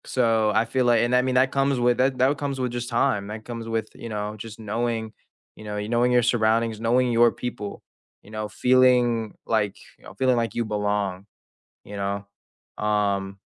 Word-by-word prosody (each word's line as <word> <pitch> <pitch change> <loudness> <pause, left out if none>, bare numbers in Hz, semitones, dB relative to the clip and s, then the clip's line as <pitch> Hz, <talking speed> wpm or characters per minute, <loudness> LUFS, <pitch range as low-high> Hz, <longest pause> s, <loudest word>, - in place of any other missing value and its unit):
So, 115 -4 +2
I 110 - +3
feel 130 +2 0
like 120 -2 +4
and, 120 +1 +2
I 125 - +5
mean, 130 0 -1
that 130 +1 +4
comes 135 -1 +1
with 120 0 +2
that 130 0 +2
that 135 +3 +2
comes 140 -2 -3
with 125 -1 -1
just 120 0 -4
time; 115 -4 +1
that 110 +1 -7
comes 115 -2 -6
with, 115 -1 -2
you 115 - -9
know, 105 -1 -3
just 110 +1 -9
knowing, 110 +1 -2 0.4
you - - -12
know, 105 -1 -5
y 105 0 -3
knowing 120 +2 +2
your 125 -1 +4
surroundings, 115 -1 +1
knowing 120 +2 +2
your 120 0 +5
people, 115 -4 -6 0.4
you 105 - -16
know, 110 -1 -4
feeling 125 -2 +3
like, - - 0 0.2
y - - -25
know, - - -11
feeling 130 +2 +2
like 115 -1 -1
you 120 - -1
belong, 105 -3 -2 0.6
you 100 - -9
know? 100 0 -3 0.6
Um, 100 -2 0
115 Hz, 200 wpm, -24 LUFS, 105-125 Hz, 0.6 s, I